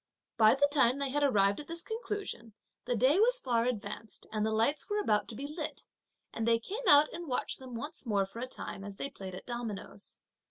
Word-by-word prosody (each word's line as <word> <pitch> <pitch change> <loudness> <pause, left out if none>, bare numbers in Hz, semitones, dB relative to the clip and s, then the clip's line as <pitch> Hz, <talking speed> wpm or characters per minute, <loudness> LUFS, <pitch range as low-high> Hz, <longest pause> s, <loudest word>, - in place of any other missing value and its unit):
By 220 0 +6
the 285 +1 +4
time 265 -3 +4
they 280 -1 -1
had 290 +2 0
arrived 200 -8 +3
at 295 - -8
this 335 0 -5
conclusion, 415 - -5 0.3
the 245 - 0
day 260 - +4
was - - +7
far 235 - +1
advanced, 215 -2 -5
and 215 -1 -1
the 220 - +1
lights 230 - +1
were 415 - 0
about 210 - +1
to 225 - -8
be 275 - -5
lit; 305 +2 -5 0.5
and 225 0 -2
they 230 0 +5
came 415 - -5
out 295 -1 +7
and 345 -1 -6
watched 250 - -2
them 255 -2 -9
once 290 +2 -6
more 200 -3 +2
for 195 +4 -10
a 255 - -3
time 195 -5 -6
as 200 -1 -7
they 275 - -3
played 190 -2 -8
at - - -9
dominoes. 230 -4 -6
250 Hz, 225 wpm, -31 LUFS, 215-295 Hz, 0.5 s, was